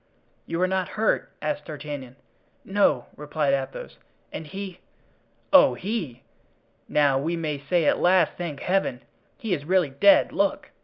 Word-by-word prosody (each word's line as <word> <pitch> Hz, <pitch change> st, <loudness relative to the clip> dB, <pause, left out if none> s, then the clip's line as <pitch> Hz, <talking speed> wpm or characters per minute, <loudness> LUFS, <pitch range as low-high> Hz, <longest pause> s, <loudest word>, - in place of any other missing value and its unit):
"You 165 Hz, -, -3 dB
are -, -, +3 dB
not 190 Hz, -1 st, -1 dB
hurt?" 220 Hz, +1 st, +1 dB
asked 150 Hz, -1 st, -2 dB
D'Artagnan. 145 Hz, -4 st, -7 dB, 0.5 s
"No," 195 Hz, -11 st, +2 dB
replied 150 Hz, -1 st, -1 dB
Athos; 135 Hz, -1 st, -4 dB, 0.3 s
"and 160 Hz, -, -6 dB
he——" 190 Hz, 0 st, -7 dB, 0.7 s
"Oh, 200 Hz, -, +7 dB
he! 170 Hz, -, -4 dB, 0.7 s
now 140 Hz, -3 st, +3 dB
we 165 Hz, +5 st, -1 dB
may 155 Hz, -4 st, -3 dB
say 160 Hz, +4 st, 0 dB
at -, -, +3 dB
last, 180 Hz, -2 st, +4 dB
thank 165 Hz, -5 st, -5 dB
Heaven! 180 Hz, -9 st, 0 dB, 0.3 s
he 220 Hz, -5 st, -2 dB
is 145 Hz, -5 st, -2 dB
really 175 Hz, -2 st, +2 dB
dead. 295 Hz, -, +5 dB
Look!" -, -, -1 dB
155 Hz, 145 wpm, -25 LUFS, 140-185 Hz, 0.7 s, Oh